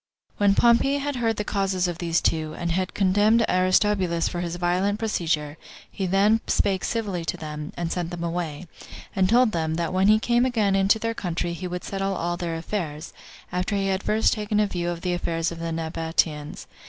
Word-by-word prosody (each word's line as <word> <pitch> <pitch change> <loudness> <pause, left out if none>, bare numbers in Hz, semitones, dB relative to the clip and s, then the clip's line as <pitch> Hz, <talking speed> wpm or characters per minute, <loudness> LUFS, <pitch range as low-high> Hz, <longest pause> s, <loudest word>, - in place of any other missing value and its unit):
3. 205 - +2
When 195 - +5
Pompey 240 +5 +4
had 285 -1 -3
heard 225 -2 +1
the 210 - -1
causes 195 -3 0
of 175 -2 -4
these 170 -1 +1
two, 155 -1 0
and 170 0 -2
had 185 +2 -1
condemned 205 +4 +3
Aristobulus 185 -1 +2
for 175 - -4
his 175 -1 -3
violent 180 +4 0
procedure, 160 -9 -1 0.3
he 190 - -3
then 205 +4 +3
spake 195 -2 +1
civilly 205 -7 -2
to - - -2
them, 150 -1 -6
and 170 -1 -2
sent 175 -2 -2
them 175 -1 -5
away; 170 -2 -3 0.5
and 185 -1 +2
told 240 0 +4
them, 160 -3 -1
that 170 +1 -2
when 190 +1 +3
he 215 +1 +6
came 240 +2 +2
again 220 -6 +1
into 195 +3 +4
their 230 +1 -2
country, 175 -4 -3
he 180 +2 -5
would 180 0 -5
settle 195 0 -2
all 175 0 -2
their 175 -2 -3
affairs, 165 -3 -4 0.4
after 180 +3 -1
he 195 -1 0
had 190 0 0
first 215 +2 +2
taken 210 -1 -1
a 210 - +4
view 175 -3 -2
of 170 -1 -4
the 180 -1 -1
affairs 165 -1 -1
of 165 - -7
the 165 0 -3
Nabateans. 160 -2 -2
185 Hz, 205 wpm, -24 LUFS, 170-205 Hz, 0.5 s, he